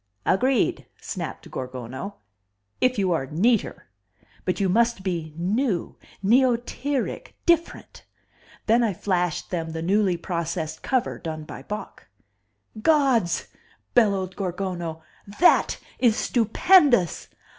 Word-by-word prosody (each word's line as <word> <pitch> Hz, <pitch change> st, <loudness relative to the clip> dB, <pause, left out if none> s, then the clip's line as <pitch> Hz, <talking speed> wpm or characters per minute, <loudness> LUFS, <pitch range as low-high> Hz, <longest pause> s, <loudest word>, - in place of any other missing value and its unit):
"Agreed," 250 Hz, +5 st, +1 dB
snapped -, -, -6 dB
Gorgono, 130 Hz, -, -6 dB, 0.6 s
"if 255 Hz, -1 st, +2 dB
you 190 Hz, -3 st, +1 dB
are 145 Hz, -6 st, 0 dB
neater. 205 Hz, -, +1 dB, 0.6 s
But 185 Hz, -, -1 dB
you 195 Hz, -, +2 dB
must 230 Hz, +1 st, +2 dB
be 170 Hz, -4 st, -3 dB
new, 200 Hz, +3 st, -1 dB, 0.3 s
neotiric, 250 Hz, +4 st, +1 dB
different." 340 Hz, -1 st, 0 dB, 0.6 s
Then 230 Hz, +2 st, +4 dB
I 210 Hz, -5 st, 0 dB
flashed 180 Hz, -3 st, -1 dB
them 165 Hz, -3 st, -3 dB
the 160 Hz, 0 st, -4 dB
newly 190 Hz, 0 st, +2 dB
processed 170 Hz, -2 st, -3 dB
cover 255 Hz, -2 st, -1 dB
done 155 Hz, -2 st, -5 dB
by 150 Hz, -, -9 dB
Bok. 210 Hz, +9 st, -7 dB, 0.7 s
"Gods!" 265 Hz, -, +2 dB, 0.4 s
bellowed 195 Hz, -5 st, +2 dB
Gorgono. 180 Hz, -4 st, -4 dB, 0.4 s
"That 355 Hz, -, +4 dB, 0.2 s
is 235 Hz, -4 st, +4 dB
stupendous! 240 Hz, -, +3 dB
195 Hz, 105 wpm, -24 LUFS, 170-240 Hz, 0.7 s, Then